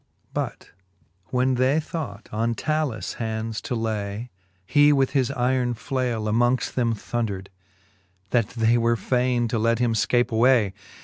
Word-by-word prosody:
XIX. - - -43
But - - -4 0.5
when 130 +4 +1
they 130 +4 +2
thought 140 -10 -6
on 115 +2 0
Talus 155 -4 -1
hands 110 0 -3
to 125 - -3
lay, 110 0 -3 0.3
He 145 +6 +5
with 135 -2 +2
his 130 -3 +1
yron 125 -2 0
flaile 120 -3 -2
amongft 120 +2 +1
them 115 -3 +1
thondred, 105 -4 -3 0.8
That 115 -4 +2
they 115 0 +2
were 115 0 +2
fayne 125 0 +1
to 115 - 0
let 115 +1 +2
him 120 -1 +1
fcape 120 +3 +2
away. 115 -3 +4
120 Hz, 145 wpm, -24 LUFS, 110-130 Hz, 0.8 s, He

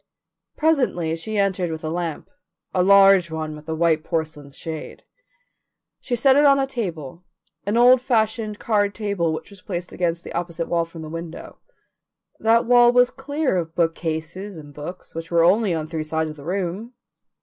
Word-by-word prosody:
Presently 250 - +1
she 210 +6 -4
entered 190 -3 +1
with 160 0 -6
a 155 - -2
lamp 170 -2 -4 0.5
a 185 - +2
large 195 -2 +6
one 155 -1 -4
with 150 +1 -12
a 160 - -1
white 160 -1 +2
porcelain 155 -3 -3
shade. 160 +2 -8 1.0
She 245 - -2
set 265 +3 +4
it 290 - +5
on 280 -1 +6
a 270 - +1
table, 175 - -5 0.4
an 210 +3 +1
old 245 +1 +6
fashioned 220 -3 0
card 205 -3 0
table 200 -6 -1
which 160 - -6
was 200 -2 -13
placed 175 -2 -5
against 170 -1 -2
the - - -8
opposite 170 -1 -3
wall 170 -1 +1
from 165 -1 -10
the - - -7
window. 165 0 -8 0.8
That 230 +1 +3
wall 240 0 +6
was 245 0 +4
clear 285 -1 -2
of 165 -2 -4
bookcases 165 +3 -2
and 145 -2 -11
books, 155 +6 -9
which 165 0 -6
were 170 -1 +3
only 205 +3 +3
on 160 -2 -1
three 160 0 -4
sides 160 0 -2
of - - -11
the 145 -1 -12
room. 195 +6 -3
175 Hz, 180 wpm, -22 LUFS, 160-220 Hz, 1.0 s, large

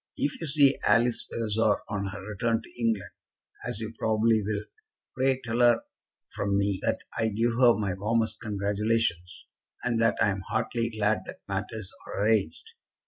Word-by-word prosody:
If 145 +3 -2
you 165 - -2
see 140 -1 +4
Alice 115 +3 +3
Vavasor 110 -1 +1
on 100 -2 -2
her 95 0 -7
return 115 +2 0
to 120 - -13
England, 110 -5 0 0.6
as 120 -3 -3
you 110 0 -5
probably 110 0 +3
will, 105 0 -2 0.5
pray 130 0 +2
tell 115 0 -2
her 120 -1 +5 0.5
from 100 -1 0
me 100 -1 +1
that - - 0 0.2
I 115 - +2
give 115 +3 +1
her 120 -2 +7
my 100 -3 -1
warmest 110 +4 0
congratulations, 105 -3 -1 0.4
and 115 -2 0
that 115 - +3
I 105 - +4
am 95 0 -4
heartily 115 0 -1
glad 110 -1 +1
that - - -9
matters 110 -4 -4 0.2
are 100 - -2
arranged. 110 - 0
110 Hz, 165 wpm, -28 LUFS, 100-115 Hz, 0.6 s, her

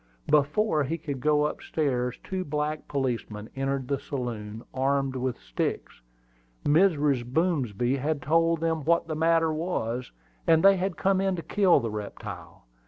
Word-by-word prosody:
Before 150 +3 +2
he 160 +5 -2
could 145 -4 -5
go 150 +1 +3
up 150 - -2
stairs 125 -5 -1
two 190 -1 -3
black 150 0 -3
policemen 120 -6 -3
entered 135 -1 -2
the 140 0 -1
saloon, 115 -4 -5
armed 135 0 0
with 130 -1 -2
sticks. - - -4 0.6
Mrs. 150 -5 +3
Boomsby 130 - 0
had 145 +2 -1
told 165 +2 +2
them 160 -2 0
what 170 +3 +2
the 160 - -3
matter 165 0 +3
was, 125 -7 -2 0.4
and 160 0 +5
they 195 0 +8
had 185 -2 -2
come 190 0 +2
in 195 -1 +1
to 170 - -5
kill 190 +1 +4
the 115 -4 -3
reptile. 105 -10 -8
145 Hz, 155 wpm, -27 LUFS, 130-165 Hz, 0.6 s, they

